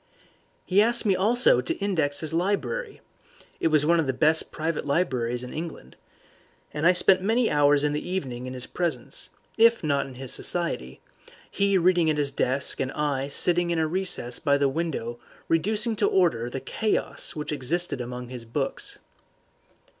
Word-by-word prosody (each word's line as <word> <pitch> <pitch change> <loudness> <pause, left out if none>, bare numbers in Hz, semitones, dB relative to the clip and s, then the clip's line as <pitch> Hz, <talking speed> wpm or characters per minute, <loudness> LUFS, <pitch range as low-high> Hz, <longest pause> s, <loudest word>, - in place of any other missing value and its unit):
He 195 +2 +4
asked 235 +2 +1
me 195 -3 +3
also 215 - +3
to 125 - -3
index 160 -8 -1
his 160 0 -4
library 205 - -2 0.6
(it - - +2
was 155 -2 +3
one 170 +2 +4
of 155 - 0
the 130 - 0
best 155 +4 +3
private 160 0 -2
libraries 125 -6 0
in 125 - -8
England), 155 - -7 0.8
and 150 +3 +1
I - - +8
spent 185 +1 +4
many 225 +4 +1
hours 145 -1 +4
in 150 0 +1
the 150 - -2
evening 130 -9 -4
in 130 - -6
his 125 - -4
presence, 180 - -3 0.3
if 230 -2 +5
not 140 -2 0
in 130 - -11
his 130 0 -3
society, 165 - -1 0.5
he 200 -1 +2
reading 175 -2 +3
at 155 - 0
his 145 -1 0
desk 135 0 0
and 135 0 -1
I 140 -2 -1
sitting 175 +4 +2
in 170 - 0
a 160 - +2
recess 155 -8 -1
by 140 -2 +2
the 140 0 +2
window 135 -6 -3 0.3
reducing 215 +7 0
to 205 - +2
order 140 -11 +2
the 135 +2 -5
chaos 215 - -2
which 150 0 -4
existed 150 +1 -2
among 125 0 -6
his 125 -2 -6
books. 135 +4 -3
155 Hz, 175 wpm, -25 LUFS, 135-185 Hz, 0.8 s, I